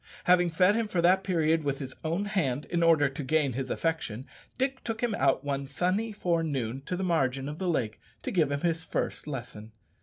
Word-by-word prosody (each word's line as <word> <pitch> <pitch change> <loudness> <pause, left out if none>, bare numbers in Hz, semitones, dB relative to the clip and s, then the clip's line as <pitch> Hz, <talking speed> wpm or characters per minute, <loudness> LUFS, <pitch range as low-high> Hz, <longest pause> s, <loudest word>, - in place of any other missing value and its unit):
Having 180 -1 +4
fed 180 +4 +4
him 225 0 0
for 185 -4 -1
that 185 +2 +5
period 165 -4 +2
with 140 -1 -1
his 135 -2 -6
own 170 +6 -1
hand, 150 -10 -1
in 170 -1 +1
order 165 -3 +5
to 135 +2 -5
gain 145 -1 +1
his 130 +2 -3
affection, 145 -8 -2 0.3
Dick 265 +1 -1
took 225 -1 -3
him 235 -3 +1
out 135 -6 +2
one 140 -1 -2
sunny 190 +9 0
forenoon 155 - -1
to 180 - -2
the 190 - -2
margin 135 -6 +1
of 150 +2 -6
the 185 -2 -1
lake 115 -10 -1 0.2
to - - -3
give 160 -6 +2
him 140 0 -1
his 165 -1 0
first - - -3
lesson. 115 -6 -7
160 Hz, 210 wpm, -29 LUFS, 135-180 Hz, 0.3 s, that